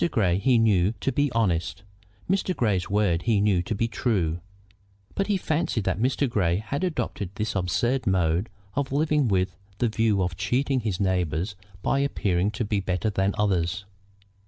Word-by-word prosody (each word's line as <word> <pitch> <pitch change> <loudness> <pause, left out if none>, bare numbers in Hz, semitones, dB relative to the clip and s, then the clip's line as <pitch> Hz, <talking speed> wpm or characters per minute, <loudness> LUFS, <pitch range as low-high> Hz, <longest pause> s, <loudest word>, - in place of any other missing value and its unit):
Grey 95 - +1
he 125 +3 +3
knew 105 -3 +3
to 135 - 0
be 145 +1 +1
honest; 95 -4 0 0.4
Mr. 190 -1 0
Grey's 100 -6 0
word 100 -4 +2
he 110 0 +2
knew 100 -3 +3
to 100 +5 -3
be 115 +3 0
true; 95 -9 0 0.7
but 195 - -1
he 205 -2 +2
fancied 155 - -1
that 95 0 -1
Mr. 130 +4 +1
Grey 90 -8 +1
had 125 - -3
adopted 120 - -2
this 105 +2 -2
absurd 120 +8 0
mode 90 +1 +1 0.2
of 140 -1 -2
living 150 -1 +2
with 95 -3 +1 0.2
the 120 - +1
view 110 -3 +1
of 90 -1 -2
cheating 130 - 0
his 105 -6 -2
neighbors 90 0 0 0.3
by 135 - +1
appearing 100 -9 +1
to 115 +2 -3
be 105 -1 0
better 95 +2 -1
than 95 0 0
others. 95 -2 0
105 Hz, 170 wpm, -25 LUFS, 90-125 Hz, 0.7 s, he